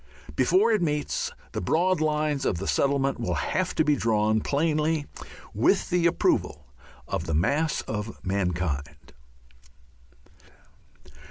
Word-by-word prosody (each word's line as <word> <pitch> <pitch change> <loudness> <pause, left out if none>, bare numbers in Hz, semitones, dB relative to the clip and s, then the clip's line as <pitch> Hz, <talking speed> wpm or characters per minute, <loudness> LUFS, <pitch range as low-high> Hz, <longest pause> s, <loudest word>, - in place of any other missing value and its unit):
Before 185 - +3
it 215 -4 +2
meets, 150 -3 -1 0.2
the - - -4
broad 170 - +1
lines 150 -2 0
of 95 - 0
the 95 - -5
settlement 140 -1 +1
will 115 - -1
have 185 -1 -1
been 150 -2 +3
drawn 110 -2 +2
plainly 155 +2 0 0.5
with 130 - +2
the 175 -1 +3
approval 75 - 0 0.4
of 80 - -3
the 80 - 0
mass 145 - +1
of 105 +1 -5
mankind. 85 -6 -3
140 Hz, 115 wpm, -26 LUFS, 100-160 Hz, 0.5 s, Before